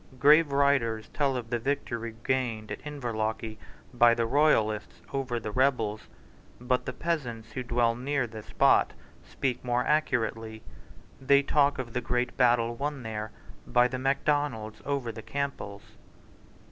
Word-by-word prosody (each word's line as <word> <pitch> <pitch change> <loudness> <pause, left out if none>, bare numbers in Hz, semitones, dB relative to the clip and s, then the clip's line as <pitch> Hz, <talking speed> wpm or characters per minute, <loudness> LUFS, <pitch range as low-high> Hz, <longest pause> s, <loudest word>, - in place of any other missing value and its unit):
Grave 150 +3 +6
writers 135 -6 +2
tell 140 -3 0
of 120 -1 -7
the 120 - 0
victory 115 -3 -3
gained 120 -5 -1
at - - -5
Inverlochy 110 -6 -3 0.3
by 120 -1 +5
the 115 -1 0
royalists 110 -6 +2
over 130 -3 -1
the 110 -1 -5
rebels. 120 -4 0 0.5
But 125 +1 -1
the - - -1
peasants 125 -8 -3
who 130 - -4
dwell 120 -1 +1
near 135 +2 -1
the 110 -2 -8
spot - - +3 0.3
speak 130 -3 -3
more 125 0 0
accurately. 115 -7 0 0.6
They 140 +1 +4
talk 140 0 +2
of 120 -3 -5
the 125 - -1
great 125 +1 -1
battle 120 -2 +3
won 140 +1 -3
there 110 -1 -4 0.4
by 120 0 +4
the 130 +1 -4
Macdonalds 135 -5 0
over 135 -4 -2
the 110 0 -8
Campbells. 135 -7 -4
125 Hz, 145 wpm, -28 LUFS, 115-140 Hz, 0.6 s, Grave